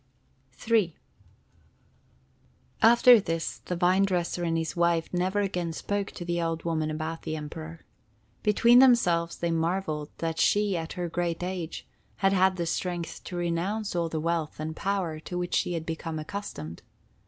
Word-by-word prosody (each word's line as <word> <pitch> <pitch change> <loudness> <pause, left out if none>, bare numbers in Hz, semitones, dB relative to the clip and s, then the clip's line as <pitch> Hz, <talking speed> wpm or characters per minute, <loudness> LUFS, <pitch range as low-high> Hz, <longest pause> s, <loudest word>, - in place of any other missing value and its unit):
III 215 -8 +3 1.9
After 235 +1 +8
this, 165 -4 -3
the 180 - -4
vine 180 +2 +3
dresser 180 -2 0
and 165 -1 0
his 160 -1 -2
wife 170 -1 +1
never 185 +3 +1
again 180 -4 -2
spoke 200 +4 -2
to 175 - -7
the 170 0 -1
old 165 -1 -2
woman 160 -2 -1
about 155 +1 -4
the 155 - -4
Emperor. 155 +2 -7 0.6
Between 235 +3 +5
themselves 180 -10 +4
they 170 -1 -1
marveled 165 -2 -1
that 165 -1 -3
she, 205 -2 +3
at 165 -1 -4
her 180 -1 -3
great 170 0 -2
age, 180 -3 -4 0.3
had 195 0 +2
had 190 0 +4
the 175 -2 -2
strength 175 0 -3
to 180 - -6
renounce 175 +5 -2
all 170 -1 0
the 160 - -2
wealth 165 -2 -2
and 155 +1 -4
power 185 -5 -2
to 180 +3 -6
which 175 0 -3
she 175 - +1
had 165 -1 -3
become 165 0 -4
accustomed. 155 - -6
170 Hz, 160 wpm, -27 LUFS, 165-190 Hz, 1.9 s, After